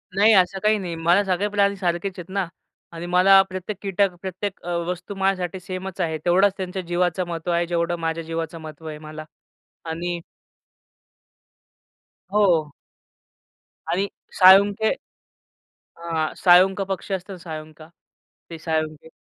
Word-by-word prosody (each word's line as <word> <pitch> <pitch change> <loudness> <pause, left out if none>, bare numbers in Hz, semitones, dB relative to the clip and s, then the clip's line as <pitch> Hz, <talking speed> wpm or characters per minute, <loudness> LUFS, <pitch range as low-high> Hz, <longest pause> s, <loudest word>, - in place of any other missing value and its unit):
नाही, 215 +3 +6
असं 190 0 +3
काही 215 0 +4
नाही. 175 -3 -4
मला 170 +5 +3
सगळे 190 +2 0
प्राणी 200 -1 +2
सारखेच 180 0 -2
आहेत 175 - -9
ना, 195 -3 0 0.4
आणि 170 0 -7
मला 185 +2 +6
प्रत्येक 185 +2 -5
कीटक, 195 0 +1
प्रत्येक 190 +1 -5
अ, 175 - -6 0.2
वस्तू 180 +2 -5
माझ्यासाठी 190 -2 -1
सेमच 185 +1 -6
आहे. 160 -2 -1
तेवढाच 190 +3 +4
त्यांच्या 185 0 -4
जीवाचं 175 +1 0
महत्त्व 170 0 -3
आहे 170 0 +1
जेवढं 170 0 0
माझ्या 165 0 -2
जीवाचं 165 0 -4
महत्त्व 155 0 -10
आहे 155 -1 -6
मला. 155 0 -8 0.6
आणि 170 +1 -3 2.1
हो. 170 -8 +3 1.2
आणि 195 +3 +1 0.3
साळुंके 200 +3 +7 1.1
हां, 165 -2 -2
साळुंका 190 +2 +5
पक्षी 195 +1 -4
असतं 190 +1 -6
ना, 185 - -8
साळुंका 155 -2 -9 0.6
ते 165 - -7
साळुंके 155 -1 -3
180 Hz, 135 wpm, -23 LUFS, 165-195 Hz, 2.1 s, साळुंके